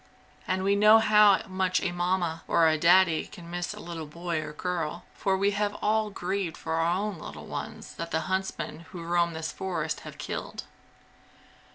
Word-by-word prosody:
And 185 0 0
we 200 +1 +3
know 210 +2 +7
how 210 -2 +5
much 185 -1 0
a 180 - -1
Mamma 175 -2 -1
or 165 -1 +4
a 160 - +4
Daddy 170 +1 +4
can 170 -3 -11
miss 175 0 -3
a - - -8
little 165 -2 -6
boy 170 +1 -3
or 150 - -6
girl, 170 0 -3
for 190 -1 0
we 200 +1 +2
have 205 0 -1
all 215 0 +1
grieved 190 -2 -3
for 160 - -4
our 165 +2 +2
own 205 -3 -3
little 75 +1 -9
ones - - -6
that 170 0 -4
the 160 - 0
huntsmen 190 -3 -3
who 175 -2 -6
roam 170 0 +1
this 160 -1 -4
forest 190 +1 -3
have - - -10
killed. - - -5
175 Hz, 185 wpm, -28 LUFS, 165-190 Hz, -, know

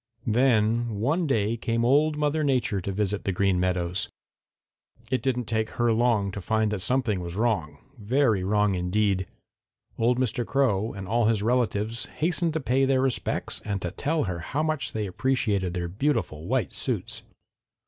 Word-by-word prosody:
"Then 115 -1 +2
one 155 - +1
day 110 -4 +1
came 115 0 -1
Old 150 +4 +3
Mother 150 +1 +1
Nature 125 -8 +1
to 100 - -3
visit 100 0 -1
the 100 - 0
Green 95 0 +1
Meadows. 90 +3 -1 1.0
It 130 -2 +1
didn't 125 -1 -1
take 110 0 -1
her 120 -1 +3
long 110 -4 +2
to 100 - -6
find 110 +3 +1
that 105 -3 -3
something 125 -4 0
was 85 -1 -6
wrong, 105 -9 0 0.2
very 110 -2 +2
wrong 105 +1 +2
indeed. 95 +1 0 0.7
Old 120 +2 +3
Mr. 125 -1 0
Crow 115 -5 +1
and 95 -1 -7
all 115 +2 +2
his 110 -2 +2
relatives 115 -1 0
hastened 165 0 0
to 160 - 0
pay 130 0 +1
their 130 -1 +2
respects 130 -2 0
and 100 -2 -2
to 90 - -2
tell 150 - -1
her 90 -4 -3
how 140 - -2
much 155 -7 -2
they 110 -1 -2
appreciated 100 -4 0
their 85 -1 -2
beautiful 100 - -1
white - - 0
suits. - - -4
110 Hz, 170 wpm, -26 LUFS, 100-130 Hz, 1.0 s, Old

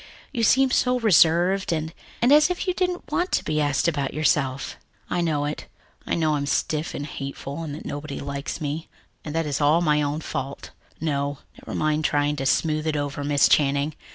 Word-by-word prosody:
You 240 - -2
seem 260 +4 +4
so 250 0 +2
reserved 185 -3 +4
and 160 0 -2 0.3
and, 245 - +5
as 300 +3 +6
if 360 - -2
you 365 - +2
didn't 360 -1 -2
want 355 +2 0
to - - +2
be 155 0 0
asked 145 +2 +1
about 145 -5 -1
yourself." 140 -3 0 0.4
"I 175 - +1
know 150 -4 0
it. 150 +1 -5 0.4
I - - 0
know 155 -2 +1
I'm 140 -1 -1
stiff 155 +2 -1
and 145 - -4
hateful, 140 +1 -6
and 150 -3 -5
that 155 - -10
nobody 145 0 -5
likes 140 +2 -5
me, 155 +1 -4 0.3
and 150 0 -6
that 165 0 +1
it - - -3
is 145 +1 -2
all 150 +4 +4
my 150 -3 +2
own 145 +2 -1
fault. 135 -2 -5 0.3
No, 145 -2 -1 0.2
never - - -6
mind 155 0 +1
trying 145 -1 +1
to 135 - -1
smooth 155 +2 +1
it 155 - 0
over, 145 0 -3
Miss 145 -1 +4
Channing. 145 +1 +2
150 Hz, 205 wpm, -24 LUFS, 145-165 Hz, 0.4 s, as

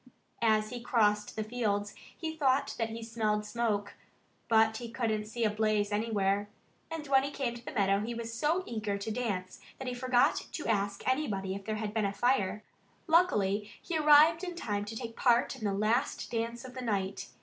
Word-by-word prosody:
As 215 -2 +2
he 245 -1 -5
crossed 210 -3 +1
the 220 - -1
fields 210 -3 -1 0.2
he 320 -1 -4
thought 275 -3 +2
that 225 -1 0
he 225 +1 -6
smelled 215 -2 -1
smoke. 210 -3 -1 0.5
But 220 -1 +4
he 235 0 -6
couldn't 225 -3 -1
see 230 +2 -3
a 215 - +4
blaze 215 -1 +1
anywhere. 205 -2 0 0.4
And 325 -2 -5
when 270 -2 +4
he 275 - -2
came 270 -4 -2
to 240 0 -10
the - - -6
meadow 195 -3 +2
he 230 +3 -3
was 230 0 -5
so 305 +10 +1
eager 215 -3 -2
to 200 +2 -4
dance 200 -6 -3 0.2
that 265 - -6
he 250 - -1
forgot 245 0 +2
to 300 - -4
ask 200 -2 -1
anybody 210 -9 0
if 195 0 -7
there 215 - -2
had 215 -1 -3
been 220 -2 +1
a 200 - -1
fire. 215 -3 +1 0.4
Luckily 210 - +3
he 345 - -5
arrived 310 +2 +6
in 355 -1 -4
time 205 -10 -2
to 220 +2 -7
take 230 0 -6
part 240 -2 +3
in 215 - -6
the 200 - +1
last 220 +7 0
dance 235 +1 -3
of 255 - -9
the 255 - -6
night. 200 - -2
225 Hz, 200 wpm, -31 LUFS, 205-250 Hz, 0.5 s, arrived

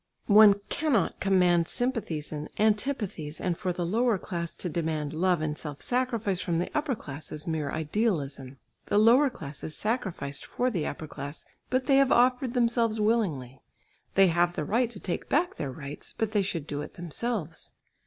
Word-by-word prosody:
One 210 -1 +8
cannot 290 -9 +1
command 180 -3 +3
sympathies 230 - -1
and 150 0 -5
antipathies, 210 - 0
and 180 -2 -1
for 180 +1 -2
the 175 0 -2
lower 225 +4 +2
class 170 -3 -4
to - - -4
demand 155 -3 -2
love 175 0 +2
and 155 -1 -1
self 150 -2 -7
sacrifice 230 -7 0
from 170 -2 -1
the 175 - -2
upper 295 -4 0
class 145 -6 -6
is 150 0 -4
mere 160 -3 -2
idealism. 150 - -2 0.3
The - - +1
lower 240 +7 +6
class 145 - -8
is 155 - -2
sacrificed 185 - -2
for 250 +1 -1
the 175 -8 -1
upper 155 - -5
class, 145 0 -7 0.2
but 255 0 +1
they 270 +1 +4
have 275 -1 +4
offered 250 +1 +3
themselves 230 -2 +2
willingly. 175 - 0 0.5
They 195 - +7
have 175 +1 +2
the 150 - -2
right 235 +6 +1
to 220 -5 -8
take 180 - -4
back 340 +5 +1
their 140 -3 -3
rights, 140 +1 -8
but 220 -1 -1
they 210 -2 +2
should 170 -6 -3
do 145 -1 -4
it - - -8
themselves. 175 0 -3
185 Hz, 180 wpm, -28 LUFS, 155-230 Hz, 0.5 s, One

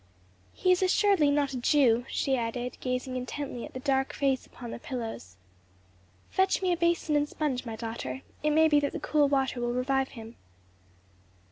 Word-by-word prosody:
"He 365 - +2
is 365 - +3
assuredly 375 -4 +4
not 285 -1 +1
a - - -2
Jew," 245 -2 +3
she 270 - 0
added, 245 +1 -3
gazing 255 0 -3
intently 255 0 -4
at - - -13
the - - -3
dark 270 0 0
face 270 -2 0
upon 240 -2 -9
the - - -6
pillows. 225 - -6 0.9
"Fetch 380 0 +2
me 365 -1 +3
a - - +2
basin 340 -2 +1
and 295 0 +1
sponge, 265 -5 -2
my 225 - -4
daughter; 220 - -5 0.2
it 300 - +1
may 315 +1 +5
be 295 -2 +4
that 285 -1 -2
the - - -3
cool 295 -2 +2
water 265 -3 0
will 240 0 -1
revive 265 +1 0
him." 225 +1 -10
265 Hz, 180 wpm, -28 LUFS, 245-295 Hz, 0.9 s, may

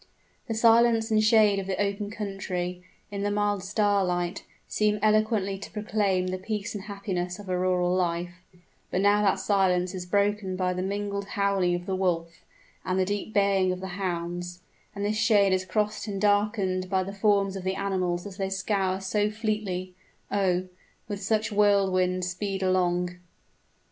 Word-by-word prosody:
The 225 - -2
silence 230 0 +4
and 215 0 +4
shade 215 -2 +5
of 190 - -5
the 190 -1 -2
open 200 0 -1
country, 190 -4 -4 0.3
in 200 -1 -4
the 205 - 0
mild 205 -1 0
starlight, 190 -3 0 0.2
seem 210 0 +1
eloquently 215 -2 +2
to - - -8
proclaim 205 -3 0
the 185 0 -3
peace 210 +2 -4
and 205 -2 -6
happiness 190 -3 -3
of 205 -2 -11
a 185 - 0
rural 180 -1 +1
life; 175 0 -2 0.5
but 180 - -1
now 205 +1 +4
that 200 -2 +3
silence 185 -3 +1
is 180 -1 -6
broken 200 -1 +1
by 185 0 0
the 180 - -3
mingled 200 +1 -2
howling 195 -3 +1
of 175 0 -5
the 190 - -1
wolf, 170 -3 -1 0.4
and 185 0 -1
the 190 - +2
deep 205 +2 -3
baying 200 -3 +3
of 185 - -3
the 190 0 -6
hounds 175 -1 -4 0.3
and 200 0 -2
this 215 +1 0
shade 210 -3 +4
is 185 0 0
crossed 210 +4 -1
and 200 -2 -3
darkened 205 -2 +1
by 190 0 +1
the 195 +1 -6
forms 200 -1 +2
of 190 - -5
the 190 +1 -1
animals 185 -3 -1
as 200 -2 -8
they 195 -1 -1
scour 195 -1 0
so 205 +2 +1
fleetly 210 -4 -3 0.4
oh! 185 -2 +1 0.4
with 205 -2 -5
such 220 +2 0
whirlwind 190 -3 +2
speed 190 +2 -3
along. 180 -1 +1
195 Hz, 170 wpm, -27 LUFS, 185-205 Hz, 0.5 s, shade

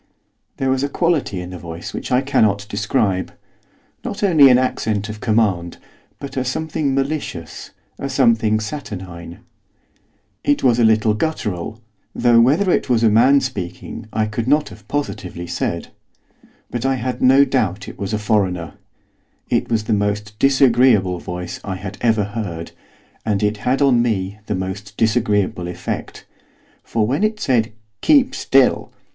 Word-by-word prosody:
There 135 0 0
was 130 0 +1
a 140 - 0
quality 150 - 0
in 90 0 -8
the 90 - -7
voice 85 0 -8
which - - -6
I 125 +1 +4
cannot 105 -7 +1
describe. 100 -2 -1 0.7
Not 200 - -5
only 155 -8 +7
an 125 - +6
accent 110 -4 -1
of 105 0 -7
command, 100 -7 +1 0.4
but 140 - -8
a 130 - 0
something 140 +1 -2
malicious, 135 - -4 0.3
a 140 - -3
something 115 -5 +3
saturnine. 95 - -7 1.0
It 145 - +1
was 120 -2 +4
a - - +4
little 110 -1 +4
guttural, 110 - -3 0.3
though 120 -1 +5
whether 155 +11 +3
it - - 0
was 120 -2 +2
a 110 - +5
man 130 +6 +5
speaking 100 -4 -6
I 110 - 0
could 110 +2 -3
not 150 +2 +2
have 105 -2 -15
positively 100 -11 -4
said; - - -3 0.8
but 120 -1 -3
I 135 0 +1
had 125 0 -4
no 135 +2 +6
doubt 105 -8 -1
it - - -10
was 100 0 -3
a 110 - 0
foreigner. 95 -6 0 0.8
It - - +1
was 115 -2 +1
the 110 - -1
most 105 +1 -1
disagreeable 125 -9 +4
voice 90 0 -6
I 95 - -4
had 95 +2 -8
ever 115 -3 +2
heard, 100 -6 -5 0.5
and 105 -2 0
it 105 +1 +1
had 130 +6 +1
on 125 -4 +4
me 105 -3 -1
the 105 - -1
most 95 +2 -6
disagreeable 105 -6 +1
effect; 90 0 -6 0.6
for 110 -2 0
when 135 - 0
it 215 0 0
said, 120 - +1 0.3
'Keep 280 -4 +4
still! 135 -1 +2
110 Hz, 155 wpm, -20 LUFS, 100-130 Hz, 1.0 s, only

